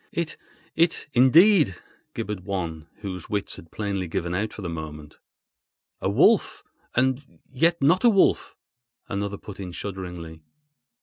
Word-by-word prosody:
"It—it—indeed!" 165 Hz, -, +2 dB, 0.4 s
gibbered 105 Hz, -1 st, -3 dB
one, 85 Hz, -4 st, -4 dB
whose 95 Hz, -4 st, -6 dB
wits 100 Hz, -1 st, -2 dB
had 80 Hz, -, -13 dB
plainly 100 Hz, -3 st, -3 dB
given 85 Hz, +1 st, -3 dB
out 105 Hz, +4 st, -1 dB
for 105 Hz, -, -9 dB
the -, -, -3 dB
moment. 75 Hz, -2 st, -7 dB, 0.8 s
"A -, -, 0 dB
wolf—and 130 Hz, +2 st, +1 dB
yet 165 Hz, +6 st, +1 dB
not 170 Hz, -, +4 dB
a 240 Hz, -, +7 dB
wolf!" 195 Hz, -4 st, +3 dB, 0.5 s
another 100 Hz, 0 st, -3 dB
put 100 Hz, -1 st, -11 dB
in 90 Hz, -2 st, -6 dB
shudderingly. 90 Hz, -3 st, -7 dB
100 Hz, 120 wpm, -25 LUFS, 90-135 Hz, 0.8 s, a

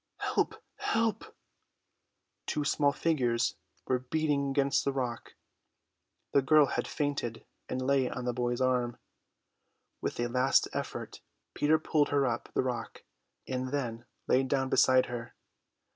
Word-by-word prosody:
"Help, -, -, 0 dB, 0.2 s
help!" 225 Hz, -1 st, -1 dB, 1.1 s
Two 150 Hz, -, -1 dB
small 145 Hz, 0 st, +3 dB
figures 125 Hz, -7 st, +1 dB, 0.3 s
were 130 Hz, -1 st, +1 dB
beating 140 Hz, +1 st, 0 dB
against 140 Hz, 0 st, +2 dB
the 140 Hz, -, +1 dB
rock; 125 Hz, -3 st, -4 dB, 1.0 s
the 140 Hz, -, +4 dB
girl 150 Hz, +2 st, +6 dB
had -, -, -2 dB
fainted 145 Hz, -6 st, -2 dB, 0.2 s
and 130 Hz, -, -2 dB
lay 130 Hz, 0 st, +2 dB
on 125 Hz, -, -5 dB
the 125 Hz, -, 0 dB
boy's 120 Hz, 0 st, -1 dB
arm. 125 Hz, -2 st, +1 dB, 1.0 s
With -, -, -3 dB
a 120 Hz, -, +1 dB
last 130 Hz, +2 st, +3 dB
effort -, -, -5 dB, 0.3 s
Peter 155 Hz, +2 st, +3 dB
pulled 155 Hz, -2 st, +1 dB
her 140 Hz, -1 st, +2 dB
up 120 Hz, -2 st, -2 dB
the -, -, +2 dB
rock 125 Hz, -2 st, -4 dB, 0.4 s
and 130 Hz, 0 st, -2 dB
then 120 Hz, -5 st, -3 dB, 0.2 s
lay 130 Hz, -, +4 dB
down 135 Hz, 0 st, 0 dB
beside 130 Hz, -1 st, +5 dB
her. 120 Hz, -1 st, -7 dB
130 Hz, 135 wpm, -30 LUFS, 125-145 Hz, 1.1 s, girl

